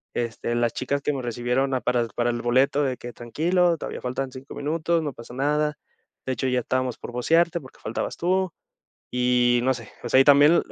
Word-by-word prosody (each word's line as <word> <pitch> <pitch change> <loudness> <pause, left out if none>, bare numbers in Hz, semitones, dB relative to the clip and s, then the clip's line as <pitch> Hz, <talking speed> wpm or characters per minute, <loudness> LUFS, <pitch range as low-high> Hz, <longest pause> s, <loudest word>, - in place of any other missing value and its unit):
Este, 120 0 -2
las 120 -1 +1
chicas 140 +2 -2
que 150 - 0
me 135 - -3
recibieron 125 +3 -1
a 130 - -1
para 125 -1 +1
el 115 - -2
para 120 0 +1
el 120 0 -3
boleto, 130 +4 +3
de 130 -3 -1
que 120 0 -8
tranquilo, 170 +9 +1
todavía - - -6
faltan 130 +1 -3
5 130 +2 -10
minutos, 165 +3 0
no 145 -3 -3
pasa 115 +1 -11
nada. 150 +2 0 0.5
De 130 - -1
hecho, 130 +2 -2
ya 125 -1 +2
estábamos 130 0 -1
por - - -8
vocearte 165 +7 +2
porque 130 - -15
faltabas 110 - -4
tú. 185 +1 +1 0.6
Y 125 -1 +3
no 130 +1 +3
sé, 115 -3 -10
o 120 - -4
sea 130 - +5
y - - +7
también,, 145 +4 +6
130 Hz, 215 wpm, -24 LUFS, 120-150 Hz, 0.6 s, y